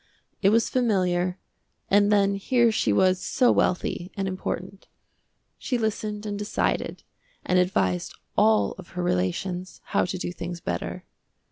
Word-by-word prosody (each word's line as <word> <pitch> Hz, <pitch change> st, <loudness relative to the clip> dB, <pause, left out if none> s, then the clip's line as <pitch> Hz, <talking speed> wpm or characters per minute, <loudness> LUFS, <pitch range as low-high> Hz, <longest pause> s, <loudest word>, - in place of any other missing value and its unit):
It 195 Hz, -, +5 dB
was 225 Hz, +2 st, +3 dB
familiar, 185 Hz, -7 st, +1 dB, 0.5 s
and 205 Hz, +1 st, +4 dB
then 200 Hz, -1 st, +4 dB
here 235 Hz, +4 st, +2 dB
she 165 Hz, -, +1 dB
was 185 Hz, -, +3 dB
so 250 Hz, -2 st, +3 dB
wealthy 180 Hz, 0 st, 0 dB
and 195 Hz, -1 st, -1 dB
important. 190 Hz, 0 st, -5 dB, 0.7 s
She 250 Hz, -, -1 dB
listened 215 Hz, -1 st, -2 dB
and 205 Hz, -1 st, -3 dB
decided, 205 Hz, 0 st, -1 dB, 0.4 s
and 180 Hz, -, +3 dB
advised 95 Hz, -, 0 dB, 0.2 s
all 105 Hz, -2 st, +4 dB
of 185 Hz, -, -10 dB
her 180 Hz, -, 0 dB
relations 175 Hz, -, -2 dB
how -, -, +1 dB
to 180 Hz, -, -3 dB
do 175 Hz, -, -3 dB
things 175 Hz, 0 st, -6 dB
better. -, -, -4 dB
185 Hz, 140 wpm, -25 LUFS, 175-205 Hz, 0.7 s, It